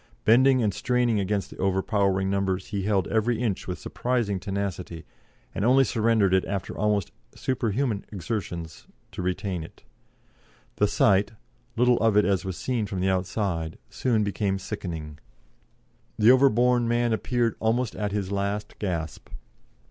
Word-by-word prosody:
Bending 130 +3 +5
and 105 -3 +1
straining 125 0 +1
against 100 0 -1
the - - -11
overpowering 95 0 +1
numbers, 95 -1 -1
he 100 - -2
held 100 -3 +1
every 115 +1 +1
inch 115 -6 -2
with 90 - -3
surprising 120 -6 -1
tenacity, 90 -4 -4 0.5
and - - -2
only 130 +4 +5
surrendered 110 -5 +2
it 95 - +4
after 100 -3 -4
almost 105 -3 0 0.2
superhuman 120 -3 -1
exertions 85 -5 -5 0.2
to - - -6
retain 90 -1 -2
it. 80 - -14 0.9
The - - +3
sight 100 +3 +3 0.4
little 125 0 +3
of 110 -2 +3
it 105 - +5
as 95 -3 +1
was 95 -2 -5
seen 120 -5 -1
from 95 -1 -4
the 95 +1 +1
outside 90 -3 -2
soon 115 -4 +1
became 100 -1 -1
sickening. 80 -7 -6 1.0
The 110 +3 +6
overborne 125 -2 +4
man 120 0 +1
appeared 120 0 0
almost 115 +1 0
at 105 -1 -2
his 100 -2 -2
last 100 +1 -3
gasp. 85 -6 -4
100 Hz, 145 wpm, -26 LUFS, 95-115 Hz, 1.0 s, The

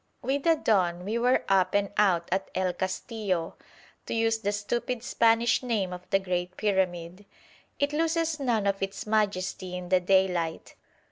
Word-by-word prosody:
With 275 +2 -1
the 330 -1 +5
dawn 180 - +1
we 220 +3 -1
were 250 +2 +2
up 190 -1 +2
and 200 -1 +1
out 180 -5 +2
at 190 +1 -1
El 185 -1 0
Castillo, 190 -2 -3 0.5
to - - -2
use 225 0 +1
the 205 -2 -1
stupid 235 +4 -3
Spanish 230 0 +3
name 215 -7 -1
of 180 0 -10
the 195 - +4
great 180 -1 -3
pyramid. 185 -2 -1 0.5
It 285 +1 0
loses 325 0 0
none 235 -6 0
of 195 -1 0
its 195 0 -4
majesty 190 -4 -1
in 180 -1 -7
the 185 0 +4
daylight. 180 -3 +1
195 Hz, 160 wpm, -27 LUFS, 185-230 Hz, 0.5 s, the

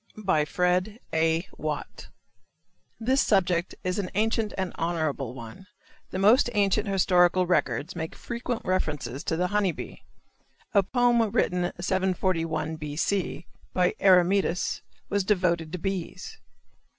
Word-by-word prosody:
FRED. 180 +6 0
A. 160 +3 +1
WATT. 150 -1 -5 0.9
This 260 +4 +2
subject 180 -3 +1
is 185 +2 -1
an 185 -3 -2
ancient 220 +1 +1
and 190 -2 -2
honorable 155 -7 -2
one. 115 - -10 0.4
The - - -4
most 215 +7 +5
ancient 205 +1 +2
historical 180 -2 +3
records 170 -3 0
make 160 -1 -5
frequent 235 0 -4
reference 160 -6 -1 0.2
to 160 - -1
the 180 - +1
honey 205 -3 +2
bee. - - -9 0.7
A 200 - +6
poem 240 +3 +2
written 180 -2 0
741 175 -4 -1
B. 150 -1 -6
C., 175 0 -1 0.3
by 180 -1 +3
Eremetus 185 -1 +3 0.3
was 200 -1 +1
devoted 180 -5 +1
to 180 - -3
bees. 195 - -5
185 Hz, 125 wpm, -27 LUFS, 165-200 Hz, 0.9 s, A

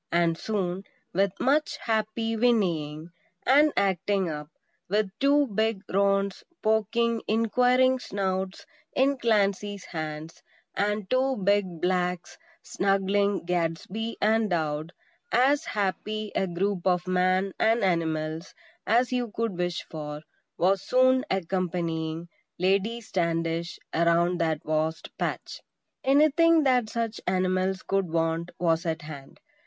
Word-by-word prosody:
And 170 -1 +2
soon, 190 -1 -3 0.3
with 195 +1 0
much 295 +4 +1
happy 225 0 -1
whinnying 170 -9 0 0.3
and 295 +3 +5
"acting 195 0 +1
up," 150 0 -6 0.4
with 205 0 +1
two 285 +1 +4
big 220 -3 -1
roans 195 0 +1 0.2
poking 225 +2 +1
inquiring 250 +4 +3
snouts 190 -3 -3 0.3
in 270 +1 +2
Clancy's 205 -3 0
hands, 155 -1 -6 0.3
and 205 0 -1
two 260 +2 +1
big 195 -4 0
blacks 180 -1 -1 0.2
snuggling 195 0 +1
Gadsby 180 +6 -2
and 220 0 +2
Dowd, 155 -2 -1 0.4
as 275 +5 +3
happy 210 +1 -2
a 190 - 0
group 185 +1 -1
of 180 -1 +2
Man 185 +1 +1
and 225 +1 +3
animals 160 -2 -1 0.3
as 240 +3 +3
you 245 -2 -1
could 225 -2 -2
wish 175 -1 -2
for, 150 -1 -7 0.3
was 190 +2 +2
soon 255 +4 +3
accompanying 170 -3 -2 0.3
Lady 200 +6 +1
Standish 170 -3 -2 0.2
around 170 +1 +2
that 160 -2 0
vast 155 +1 -2
patch. - - -3 0.4
Anything 310 +4 +4
that 250 -5 +2
such 230 -1 -3
animals 185 0 0
could 195 -3 0
want 165 +1 -1
was 165 0 +1
at 160 0 -2
hand. 140 -3 -10
195 Hz, 115 wpm, -27 LUFS, 170-225 Hz, 0.4 s, and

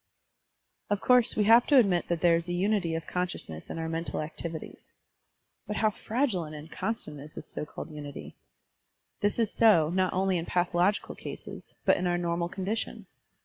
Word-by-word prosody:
Of 205 -1 +1
course, 250 0 +4
we 210 - +3
have 230 +3 +6
to 285 - +6
admit 195 -8 +4
that 170 -1 -1
there 170 -1 +5
is 170 +1 -2
a 175 - -2
tmity 180 -3 +1
of 165 - -6
consciousness 175 - -4
in - - -5
our 160 0 -3
mental 165 +1 -3
activities. 160 +1 -6 0.8
But 210 - -3
how 215 0 +2
fragile 220 -4 -1
and 155 -1 -8
inconstant 165 +2 -4
is 150 +2 -11
this - - -7
so 150 - -6
called 155 - -8
tmity! 145 -2 -8 0.9
This 205 0 +1
is 225 -3 +1
so, 170 -9 +5
not 185 0 +1
only 190 -1 +1
in 165 - -5
pathological 180 +3 +1
cases, - - -9
but - - +5
in 180 - -1
our 175 0 +1
normal 170 0 -1
condition. 200 +5 -3
175 Hz, 180 wpm, -29 LUFS, 165-210 Hz, 0.9 s, have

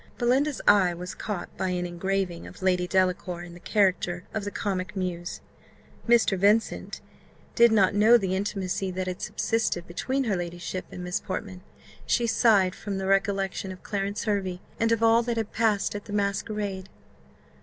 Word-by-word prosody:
Belinda's 265 +4 +1
eye 185 -4 +5
was 180 +2 -6
caught 205 -5 -5
by 190 - -1
an 180 -1 -1
engraving 175 0 -2
of 185 - -12
Lady 180 -1 +2
Delacour 180 -1 0
in 175 -1 -10
the 175 - -12
character 180 -3 +1
of 220 - -2
the - - -2
comic 200 0 -3
muse. 175 -2 -4 0.7
Mr. 235 -4 +4
Vincent 210 +4 +1 0.5
did 235 -1 +6
not 200 -4 +4
know 215 +4 +6
the 190 -4 -1
intimacy 195 -1 -2
that 185 0 -3
had 185 -1 -5
subsisted 220 -6 -1
between 260 +11 -2
her 215 -6 0
ladyship 175 +1 -4
and 180 - -7
Miss 180 0 -1
Portman 185 -1 -5 0.5
she 240 - +2
sighed 205 -5 +4
from 200 0 -5
the 190 - -3
recollection 195 -1 0
of 185 - -11
Clarence 200 0 -2
Hervey, 195 -4 -1 0.2
and 230 0 +2
of 230 0 +2
all 225 +1 +5
that 235 -1 -2
had 220 -2 -2
passed 220 -3 +1
at 205 0 -6
the 205 - -8
masquerade. 200 -1 -2
195 Hz, 170 wpm, -26 LUFS, 180-215 Hz, 0.7 s, did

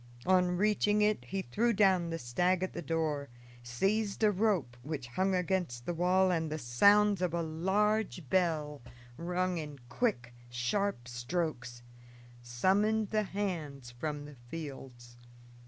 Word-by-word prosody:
On 180 -1 +3
reaching 210 +1 +2
it 210 0 +1
he 195 0 -3
threw 230 - +1
down 190 -4 +3
the 165 - -3
stag 175 +8 0
at 185 - -3
the 175 - -5
door, 150 -2 -2 0.3
seized 195 - -1
a 210 - +5
rope 195 - 0
which 140 -1 -5
hung 190 +8 0
against 180 -9 -1
the 175 - -2
wall, 180 +2 +3
and 160 -3 -1
the 155 - -2
sounds 200 - +4
of 175 -2 0
a 170 - 0
large 190 +2 0
bell, 155 -4 0 0.3
rung 180 +2 -1
in 150 -2 -7
quick, 125 - -1 0.2
sharp 125 +4 -1
strokes, 120 -1 -3 0.6
summoned 195 - +1
the 215 0 +2
hands 155 -11 -4
from 145 +4 -4
the 145 -2 -12
fields. 130 -6 -8
170 Hz, 140 wpm, -32 LUFS, 140-195 Hz, 0.6 s, a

